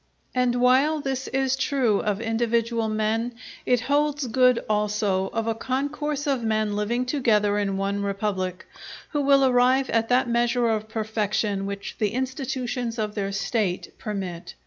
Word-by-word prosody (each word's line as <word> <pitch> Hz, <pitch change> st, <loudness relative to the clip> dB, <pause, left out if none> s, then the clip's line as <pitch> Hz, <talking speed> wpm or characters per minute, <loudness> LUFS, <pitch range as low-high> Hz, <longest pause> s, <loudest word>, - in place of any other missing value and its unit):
And 250 Hz, -1 st, +2 dB
while 260 Hz, +5 st, +3 dB
this 270 Hz, -2 st, -3 dB
is 265 Hz, 0 st, +1 dB
true 260 Hz, -6 st, +1 dB
of 205 Hz, -1 st, -1 dB
individual 230 Hz, 0 st, 0 dB
men, 220 Hz, +2 st, -1 dB, 0.3 s
it 250 Hz, -2 st, +3 dB
holds 290 Hz, +2 st, +1 dB
good 250 Hz, 0 st, +3 dB
also 210 Hz, -2 st, 0 dB
of 225 Hz, +2 st, -3 dB
a 225 Hz, -, +1 dB
concourse 285 Hz, +5 st, -2 dB
of 270 Hz, -5 st, 0 dB
men 215 Hz, -2 st, 0 dB
living 235 Hz, +4 st, 0 dB
together 215 Hz, -6 st, +2 dB
in 195 Hz, -1 st, -1 dB
one 200 Hz, +1 st, -1 dB
republic, 195 Hz, -2 st, -2 dB, 0.5 s
who 295 Hz, -, 0 dB
will 275 Hz, -1 st, +5 dB
arrive 255 Hz, +1 st, +3 dB
at 225 Hz, 0 st, +1 dB
that 250 Hz, 0 st, +3 dB
measure 235 Hz, 0 st, +2 dB
of 220 Hz, -1 st, -1 dB
perfection 210 Hz, -2 st, -1 dB
which 200 Hz, 0 st, -6 dB
the 210 Hz, -2 st, 0 dB
institutions 255 Hz, -2 st, -3 dB
of 210 Hz, -1 st, -2 dB
their 200 Hz, -2 st, -2 dB
State 195 Hz, -2 st, -2 dB
permit. 190 Hz, -5 st, -5 dB
230 Hz, 150 wpm, -25 LUFS, 210-255 Hz, 0.5 s, will